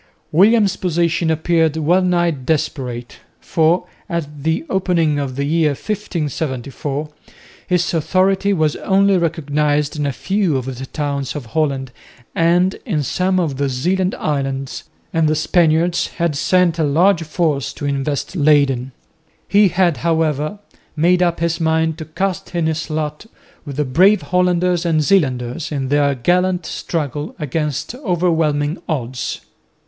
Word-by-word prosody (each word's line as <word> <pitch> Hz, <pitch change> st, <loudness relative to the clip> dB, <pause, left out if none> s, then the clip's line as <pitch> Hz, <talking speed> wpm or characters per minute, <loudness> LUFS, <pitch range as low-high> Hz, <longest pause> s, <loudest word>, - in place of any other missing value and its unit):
William's 200 Hz, +3 st, +4 dB
position 170 Hz, -1 st, 0 dB
appeared 160 Hz, 0 st, +1 dB
well 170 Hz, +4 st, +3 dB
nigh 175 Hz, -2 st, +2 dB
desperate, 130 Hz, -4 st, -3 dB, 0.2 s
for 165 Hz, +2 st, +1 dB, 0.2 s
at 150 Hz, -4 st, -4 dB
the 160 Hz, +2 st, -1 dB
opening 170 Hz, -6 st, +1 dB
of 135 Hz, -3 st, -3 dB
the 140 Hz, -, -1 dB
year 155 Hz, 0 st, +2 dB
1574 150 Hz, -, -4 dB, 0.6 s
his 180 Hz, -1 st, +1 dB
authority 190 Hz, +4 st, +2 dB
was 155 Hz, -6 st, +1 dB
only 195 Hz, 0 st, +3 dB
recognised 150 Hz, -3 st, 0 dB
in 145 Hz, -1 st, -1 dB
a -, -, 0 dB
few 190 Hz, -, 0 dB
of 130 Hz, -, -4 dB
the 130 Hz, 0 st, -6 dB
towns 140 Hz, -2 st, -3 dB
of 145 Hz, -4 st, -5 dB
Holland 135 Hz, 0 st, -1 dB, 0.4 s
and 175 Hz, +3 st, +2 dB
in 165 Hz, -, -1 dB
some 185 Hz, +5 st, 0 dB
of 155 Hz, -7 st, -1 dB
the 140 Hz, 0 st, 0 dB
Zeeland 180 Hz, +9 st, 0 dB
islands, 135 Hz, -2 st, -3 dB, 0.3 s
and 165 Hz, -1 st, +2 dB
the 155 Hz, -, +2 dB
Spaniards 165 Hz, +2 st, +2 dB
had 170 Hz, -4 st, -2 dB
sent 175 Hz, +2 st, +2 dB
a -, -, +3 dB
large 165 Hz, +5 st, +3 dB
force 155 Hz, -3 st, -1 dB
to 145 Hz, -, -6 dB
invest 140 Hz, +4 st, -2 dB
Leyden. 140 Hz, -5 st, +2 dB, 0.5 s
He 205 Hz, 0 st, +5 dB
had, 175 Hz, -4 st, +2 dB
however, 155 Hz, -, 0 dB, 0.4 s
made 175 Hz, +3 st, +3 dB
up 175 Hz, -1 st, +1 dB
his 170 Hz, 0 st, 0 dB
mind 160 Hz, 0 st, +1 dB
to 160 Hz, -, -5 dB
cast 190 Hz, +3 st, -3 dB
in 170 Hz, -2 st, +1 dB
his 160 Hz, +1 st, -2 dB
lot 155 Hz, +5 st, -3 dB, 0.4 s
with 140 Hz, -, -5 dB
the 150 Hz, +1 st, 0 dB
brave 185 Hz, +11 st, +4 dB
Hollanders 180 Hz, -1 st, +1 dB
and 160 Hz, -3 st, +1 dB
Zeelanders 140 Hz, -5 st, 0 dB
in 135 Hz, -3 st, -2 dB
their 145 Hz, -1 st, +2 dB
gallant 180 Hz, +5 st, +1 dB
struggle 150 Hz, -2 st, -4 dB
against 150 Hz, -, -3 dB
overwhelming 165 Hz, -, 0 dB
odds. 130 Hz, -5 st, -3 dB
160 Hz, 140 wpm, -18 LUFS, 145-180 Hz, 0.6 s, He